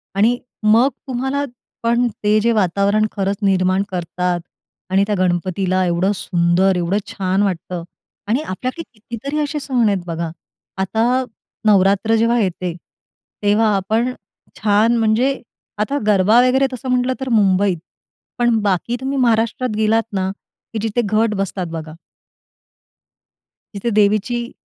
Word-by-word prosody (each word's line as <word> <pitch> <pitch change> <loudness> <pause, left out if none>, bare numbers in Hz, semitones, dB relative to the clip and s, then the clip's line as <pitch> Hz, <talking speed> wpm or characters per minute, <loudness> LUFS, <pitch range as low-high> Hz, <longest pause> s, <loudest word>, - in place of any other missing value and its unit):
आणि 225 +5 +3 0.3
मग 225 +5 +5 0.2
तुम्हाला, 265 +3 -1 0.4
पण 235 +1 +2 0.2
ते 210 +1 +4
जे 235 +2 +2
वातावरण 200 +1 +2
खरंच 195 0 -1
निर्माण 190 -1 +2
करतात 180 0 -2 0.5
आणि 190 +1 +3
त्या 210 - 0
गणपतीला 185 +1 0
एवढं 175 +3 +1
सुंदर 180 +1 +2
एवढं 175 +3 0
छान 190 +1 0
वाटतं. 180 -2 -3 0.4
आणि 235 +7 +1
आपल्याकडे 255 - -4
कितीतरी 235 +7 -5
असे 300 +1 -3
सण 255 -5 +1
आहेत 195 -3 -1
बघा. 165 -1 -3 0.5
आता 225 +7 +1 0.4
नवरात्र 200 +2 +4
जेव्हा 230 +2 +2
येते, 180 -4 -2 0.7
तेव्हा 210 +2 +3
आपण 220 +6 0 0.5
छान 220 +3 +3
म्हणजे, 230 +5 +1 0.4
आता 215 +7 -1
गरबा 210 +3 +5
वगैरे 265 +2 +3
तसं 255 +1 -6
म्हटलं 250 0 +1
तर 265 -1 -4
मुंबईत, 200 -4 +3 0.6
पण 240 -1 +3
बाकी 205 +3 0
तुम्ही 270 +1 -2
महाराष्ट्रात 230 -1 +1
गेलात 220 +1 +2
ना, 190 -1 0 0.4
की 220 - -2
जिथे 230 +3 0
घट 215 +1 +2
बसतात 195 -2 -2
बघा 160 -1 -6 1.8
तिथे 200 +4 -2
देवीची 215 +3 +1
210 Hz, 130 wpm, -19 LUFS, 190-235 Hz, 1.8 s, मग